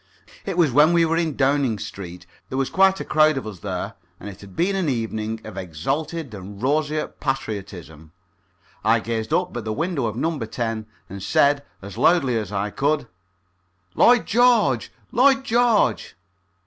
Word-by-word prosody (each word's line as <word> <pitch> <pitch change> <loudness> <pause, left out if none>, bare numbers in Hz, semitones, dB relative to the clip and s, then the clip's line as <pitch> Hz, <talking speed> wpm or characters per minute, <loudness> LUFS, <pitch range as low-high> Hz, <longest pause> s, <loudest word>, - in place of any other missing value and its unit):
It 190 -3 -3
was 165 -6 +4
when 150 +6 +5
we 170 -1 +4
were 165 0 0
in 165 -4 0
Downing 135 -4 +1
Street. 90 -3 -8 0.2
There 130 - -4
was 135 -1 -1
quite 190 0 +4
a - - -5
crowd 155 -1 +3
of 135 - -4
us 105 -5 -8
there, 95 -1 -4 0.3
and 105 - -8
it 100 0 -12
had 100 -2 -13
been 190 +3 +1
an 185 -5 0
evening 110 -2 -3
of 110 -3 -9
exalted 135 - -3
and 100 0 -9
roseate 150 +4 -1
patriotism. 95 - -5 0.7
I 110 +2 +4
gazed 110 +1 -4
up 175 -2 0
at 120 - -4
the 110 - -3
window 150 -1 -1
of 110 - -4
No. 160 +5 -1
10 115 -1 -3 0.2
and 100 +1 -8
said, 140 +8 +2 0.2
as 100 -2 -8
loudly 140 -8 +3
as 105 -4 -3
I 100 +1 -2
could: 145 0 0 0.8
"Lloyd 245 -1 +5
George! 225 - +3 0.2
Lloyd 270 +2 +4
George!" 235 - +2
130 Hz, 170 wpm, -22 LUFS, 105-165 Hz, 0.8 s, when